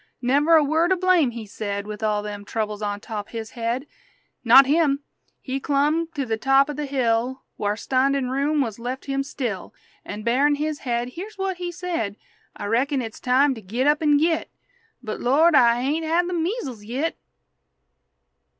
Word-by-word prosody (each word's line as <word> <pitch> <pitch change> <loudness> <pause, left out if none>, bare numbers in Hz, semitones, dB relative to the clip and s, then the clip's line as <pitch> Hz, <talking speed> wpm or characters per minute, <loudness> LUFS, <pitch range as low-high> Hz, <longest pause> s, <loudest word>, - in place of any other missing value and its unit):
Never 285 +6 +3
a 315 - +6
word 320 +5 +2
o' - - +5
blame 365 -6 +3
he 230 -2 -7
said, 200 0 -4
With 210 0 -7
all 210 -1 0
them 205 -1 -6
troubles 215 0 -3
on 205 -1 -2
top 210 -3 -6
his 225 -1 -6
head! 235 +3 -2 0.6
Not 250 +3 +8
him.... 285 -1 +2 0.4
He 265 0 -4
clumb 295 +4 +1
to 280 -2 -1
the 225 -2 -1
top 270 +4 +3
o' - - -5
the 295 0 -4
hill 255 -1 0
Whar' 205 0 -1
standin' 265 +1 +1
room 285 +3 +1
wuz 230 -4 -3
left 250 +3 -5
him 275 0 -1
still, 250 -9 -5 0.3
An', 210 +1 -7
barin' 270 +6 +3
his 300 0 -3
head, 240 -1 -2
here's 385 +10 -8
what 385 -1 -2
he 355 -1 -4
said: 345 - -3 0.4
"I - - -6
reckon 260 +7 +1
it's 225 -3 -6
time 265 +3 +3
to 225 - -9
git 230 +7 -2
up 295 +1 +3
an' 295 -2 +4
git; 320 +2 +1 0.5
But, 215 -2 -5
Lord, 310 +7 +4
I 240 -3 +5
hain't 300 +5 0
had 335 +2 +1
the 360 - -3
measels 325 - -3
yit!" 260 +9 -3
270 Hz, 185 wpm, -23 LUFS, 230-300 Hz, 0.6 s, Not